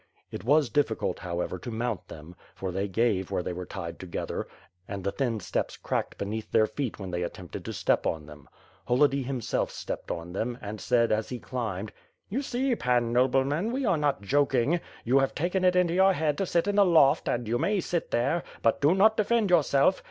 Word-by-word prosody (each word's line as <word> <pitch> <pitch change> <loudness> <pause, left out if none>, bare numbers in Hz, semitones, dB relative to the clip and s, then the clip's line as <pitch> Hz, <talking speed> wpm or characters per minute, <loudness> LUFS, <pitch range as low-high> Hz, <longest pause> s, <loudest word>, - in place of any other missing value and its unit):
It - - -6
was 140 0 +3
difficult, 115 -9 0
however, 90 0 -3
to 120 - -7
mount 115 -2 -3
them, 80 +3 -11 0.2
for 95 -1 -4
they 95 +3 -1
gave 100 -2 +1
where 90 - -1
they 90 - -3
were 90 0 -6
tied 85 -4 -6
together, 90 -2 -4 0.4
and 100 -2 -5
the 100 - 0
thin 120 -3 -1
steps 90 - -3
cracked - - -3
be - - -3
neath 110 +2 -4
their 110 - +5
feet 130 +1 -4
when 95 -2 -6
they 90 0 -2
attempted 90 0 -6
to - - -4
step - - +1
on 80 -2 -2
them. 75 -1 -14 0.4
Holody 140 +2 +3
himself 125 -3 -1
stepped - - -6
on 85 +1 -5
them 120 +5 -2
and 105 +1 -7
said, 120 -1 +2
as 110 0 0
he 125 - -4
climbed: 110 -5 -4 0.4
"You 250 +7 -1
see. 260 -1 0
Pan 120 - +1
Nobleman, 135 - +2
we 265 +1 -1
are - - +3
not 145 -6 0
joking. 140 - +2 0.3
You 130 +4 +4
have 135 - 0
taken 180 +4 0
it 180 0 +4
into 180 -2 +3
your 190 +1 +5
head 155 -3 0
to 195 - 0
sit 170 0 +1
in 205 0 0
the 205 - +7
loft 160 -7 +4
and 120 -2 -1
you 120 +2 0
may 205 +6 +1
sit 175 -2 -2
there; 125 +9 +1 0.2
but 115 - +2
do 150 +5 +4
not 215 +3 +5
defend 215 -2 +2
yourself. 160 +1 +4
125 Hz, 210 wpm, -28 LUFS, 100-165 Hz, 0.4 s, the